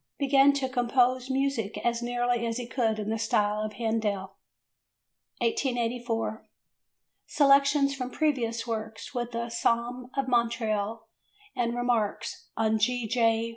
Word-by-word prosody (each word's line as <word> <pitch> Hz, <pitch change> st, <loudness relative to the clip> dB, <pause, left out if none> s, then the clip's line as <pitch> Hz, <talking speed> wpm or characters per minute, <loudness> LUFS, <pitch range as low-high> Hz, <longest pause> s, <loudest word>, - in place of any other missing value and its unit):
Began 280 Hz, 0 st, +5 dB
to 275 Hz, -2 st, -1 dB
compose 255 Hz, 0 st, +1 dB
music 265 Hz, -6 st, -1 dB
as 235 Hz, 0 st, +1 dB
nearly 245 Hz, 0 st, 0 dB
as 230 Hz, 0 st, -2 dB
he 245 Hz, -, -4 dB
could 230 Hz, -2 st, 0 dB
in 215 Hz, 0 st, -3 dB
the 225 Hz, -, -1 dB
style 210 Hz, -1 st, +1 dB
of 215 Hz, 0 st, -3 dB
Handel. 210 Hz, -3 st, -2 dB, 1.0 s
1884. 235 Hz, -2 st, -1 dB, 0.8 s
Selections 280 Hz, 0 st, +4 dB
from 255 Hz, -2 st, -4 dB
Previous 245 Hz, -6 st, 0 dB
Works 220 Hz, -1 st, -5 dB
with 240 Hz, -1 st, -3 dB
"A 235 Hz, 0 st, -3 dB
Psalm 240 Hz, +2 st, -1 dB
of 275 Hz, -1 st, 0 dB
Montreal" 225 Hz, -2 st, 0 dB, 0.5 s
and 235 Hz, -1 st, 0 dB
"Remarks 245 Hz, -4 st, -1 dB
on 220 Hz, 0 st, +2 dB
G. 245 Hz, +2 st, +1 dB
J. 230 Hz, 0 st, +2 dB
235 Hz, 130 wpm, -28 LUFS, 225-255 Hz, 1.0 s, Began